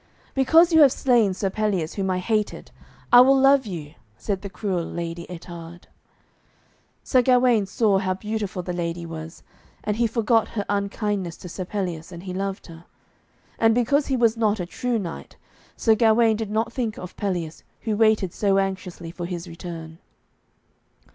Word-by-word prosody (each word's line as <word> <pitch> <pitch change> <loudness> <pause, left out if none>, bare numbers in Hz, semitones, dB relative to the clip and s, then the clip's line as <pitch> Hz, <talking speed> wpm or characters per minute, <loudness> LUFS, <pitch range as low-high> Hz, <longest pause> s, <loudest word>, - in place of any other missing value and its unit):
'Because 325 +6 +5
you 320 - +7
have 280 -3 +7
slain 240 -7 +3
Sir 190 +1 -2
Pelleas, 195 -6 -1
whom 195 -2 -2
I 185 - +1
hated, 210 +3 -2 0.4
I 245 - +11
will 270 +1 +5
love 270 -2 +5
you,' 160 -6 -7 0.2
said 195 -3 -3
the 200 - -6
cruel 190 -3 -2
Lady 170 0 -5
Ettarde. 170 -1 -10 1.2
Sir 255 - +3
Gawaine 245 -4 +3
saw 200 -1 +2
how 185 -1 -1
beautiful 205 -2 -4
the 180 - -4
lady 170 0 -3
was, 165 0 -8 0.4
and 210 0 -1
he 235 0 +2
forgot 225 0 +2
her 205 - -1
unkindness 200 -3 -2
to 180 - -10
Sir 185 +2 -5
Pelleas, 180 -4 -4
and 170 0 -9
he 185 -1 -6
loved 195 +1 -4
her. 165 0 -13 0.7
And 225 0 +4
because 275 +4 +2
he 265 - 0
was 230 -2 +3
not 215 -2 +1
a 180 - -2
true 245 +6 -2
knight, 180 -6 -7 0.4
Sir 225 - +4
Gawaine 225 0 +4
did 220 -1 -4
not 220 +2 -1
think 230 -4 -2
of 180 - -8
Pelleas, 175 -6 -3 0.2
who 220 -2 -1
waited 215 -4 +2
so 200 -2 +1
anxiously 185 -3 -3
for 175 0 -6
his 175 -1 -5
return. 165 -1 -8
200 Hz, 170 wpm, -24 LUFS, 175-225 Hz, 1.2 s, I